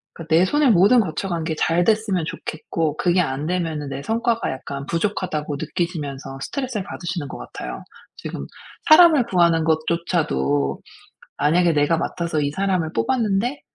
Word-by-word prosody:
그 165 - -8
내 165 +3 +4
손에 295 +6 +2
모든 210 +4 +5
거쳐 190 -2 -2
간 170 -3 -2
게 160 -1 -2
잘 165 +3 +2
됐으면 215 -4 +1
좋겠고 155 -1 -3
그게 180 0 +2
안 145 -1 -2
되면은 165 -5 -2
내 135 +1 -5
성과가 230 +4 0
약간 140 +1 -6
부족하다고 165 -4 -2
느끼시면서 140 -7 -4
스트레스를 250 - -3
받으시는 175 -4 -5
것 - - -8
같아요. - - -7 0.3
지금 - - -6 0.4
사람을 310 -5 +7
구하는 170 -6 +3
것조차도 155 - 0 0.6
'만약에 170 +3 +3
내가 150 +2 +2
맡아서 170 -1 -2
이 145 -1 0
사람을 185 -3 -1
뽑았는데 240 +1 0
170 Hz, 350 characters per minute, -22 LUFS, 150-200 Hz, 0.6 s, 사람을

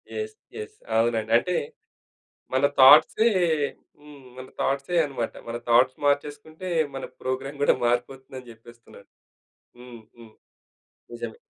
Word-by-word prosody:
Yes. 435 0 -5 0.2
Yes. 430 -1 -9 0.2
అవునండి. 115 -1 0
అంటే 180 +8 -2 1.0
మన 130 +2 +3
థాట్‌సే. 155 - +7 0.7
హ్మ్. 145 -2 -15
మన 130 0 -9
థాట్‌సే 140 +6 -1
అన్నమాట. 130 -5 -4
మన 115 0 -4
థాట్స్ 125 +2 +4
మార్చేసుకుంటే 150 +5 -2 0.3
మన 135 - -5 0.2
ప్రోగ్రామ్ 135 +2 -4
కూడా - - +4
మారిపోతుంది 130 +2 -2
అని 125 -2 -15
చెప్పేస్తున్నారు. 115 +1 -17 0.7
హ్మ్ 125 -2 -12 0.2
హ్మ్. 115 -2 -15 0.8
నిజమే. 285 - -7
130 Hz, 115 wpm, -25 LUFS, 120-150 Hz, 1.0 s, థాట్‌సే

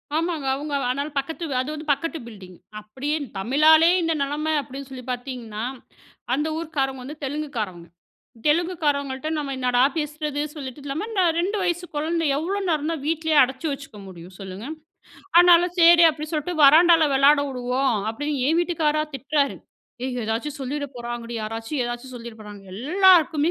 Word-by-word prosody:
ஆமாங்க. 320 -3 -1
அவங்க 290 +1 -5 0.2
ஆனால 280 +3 -1
பக்கத்து, 320 +5 -6 0.2
அது 260 - -5
வந்து 305 0 -8
பக்கத்து 330 +3 -4
பில்டிங். 185 -5 -12 0.2
அப்டியே 265 +9 -3 0.2
தமிழாலே 310 - +5
இந்த 330 -1 +1
நிலைமை 295 +3 -1
அப்டின்னு 275 0 -9
சொல்லிப் 255 -1 -9
பாத்தீங்கன்னா, 245 -4 -5 0.7
அந்த 295 +2 -1
ஊர்க்காரங்க 275 -5 -2
வந்து 290 +4 -8
தெலுங்கு 295 +2 -3
காரவங்க. 180 -6 -4 0.6
தெலுங்கு 340 +4 +2
காரங்கள்ட்ட 280 -1 -1
நம்ம 280 -2 -3
என்னடா 250 -1 +2 0.2
பேசுறது 300 -1 -3
சொல்லிட்டு 270 -1 -7
இல்லாம, 290 +9 -3
இந்த 405 -4 +1 0.2
2 390 +5 0
வயசு 355 0 -1
குழந்த 325 +3 -1
எவ்ளோ 375 +7 -2
நேரம் 310 -1 0
தான் 315 -4 -4
வீட்லயே 320 -1 +1
அடைச்சு 265 +5 -3
வச்சுக்க 275 -7 -8
முடியும் 180 0 -12
சொல்லுங்க. 195 +2 -8 0.8
ஆனால 350 0 +6
செரி 340 0 +7
அப்டி 305 0 -7
சொல்லிட்டு, 315 +3 -2
வராண்டால 325 +2 +7
விளையாடவுடுவோ, 270 -2 +2 0.3
அப்டின்னு 290 +3 -3
என் 325 +2 +2
வீட்டுக்கார்ரா 310 -3 0
திட்டுறாரு. 280 +2 0 0.5
ஏய் 255 -1 -3
எதாச்சு 225 +7 -2
சொல்லிறபோறாங்கடி. 245 -4 -5
யாராச்சு 225 +5 -5
எதாச்சு 240 +1 -5
சொல்லிறபோறாங்க. 220 -4 -10
"எல்லாருக்குமே 330 - +4
285 Hz, 145 wpm, -23 LUFS, 250-320 Hz, 0.8 s, செரி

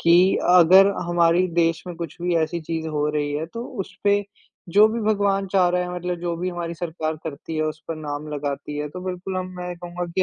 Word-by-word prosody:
कि 170 0 +5 0.4
अगर 180 +2 +8 0.2
हमारी 175 +1 +3
देश 165 -1 +2
में 175 - -5
कुछ 170 -2 -6
भी 175 0 +1
ऐसी 165 +1 0
चीज़ 160 0 -4
हो 150 -1 0
रही 150 -1 -1
है, 150 +2 -2
तो 230 +8 -7 0.2
उस 190 - -7
पे 205 0 +4 0.5
जो 210 +3 +7
भी 230 +1 -2
भगवान 200 -2 +1
चाह 185 -2 +4
रहा 180 0 +1
है, 180 0 -4
मतलब 180 0 -3
जो 170 -1 -2
भी 180 +2 -2
हमारी 170 -1 -4
सरकार 160 -2 -3
करती 160 +1 -6
है, 155 - +1
उस 155 0 -3
पर 165 - -3
नाम 150 -1 -5
लगाती 145 0 -4
है, 150 0 -3
तो 180 +5 -8
बिल्कुल 185 0 -4
हम 185 0 -2
मैं 180 0 -5
कहूँगा 175 0 -5
कि 190 - +3
170 Hz, 230 wpm, -23 LUFS, 155-180 Hz, 0.5 s, अगर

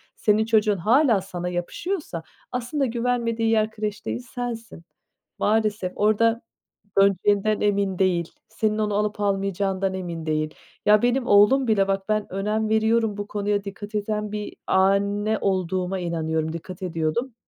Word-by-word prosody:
senin 215 +1 +2
çocuğun 215 -3 +3
hâlâ 230 - +3
sana 180 -1 -5
yapışıyorsa, 180 - -4 0.3
aslında 250 +3 -1
güvenmediği 235 -1 0
yer 220 -1 +2
kreş 210 -1 -4
değil, 110 +2 -2 0.2
sensin. 230 -7 -5 0.6
Maalesef, 210 -3 +1
orada 225 +2 +2 0.6
döneceğinden 200 +2 +3
emin 200 -2 +1
değil. 175 -3 +1 0.2
Senin 215 -1 -1
onu 210 -1 0
alıp 210 0 -1
almayacağından 195 -1 0
emin 170 -3 -5
değil. 155 0 -1 0.3
Ya, 210 0 +6
benim 245 +1 +1
oğlum 210 +6 +5
bile 200 -3 +3
bak, 195 +1 -2
ben 215 -3 -1
önem 215 +3 -1
veriyorum, 220 -1 +2
bu 205 0 -4
konuya 205 -1 -1
dikkat 205 +2 -8
eden 210 0 -2
bir 210 -1 -5
anne 200 +3 +2
olduğuma 185 0 -1
inanıyorum, 160 -2 -2
dikkat 180 +4 -8
ediyordum. 170 +9 -2
205 Hz, 135 wpm, -24 LUFS, 190-220 Hz, 0.6 s, Ya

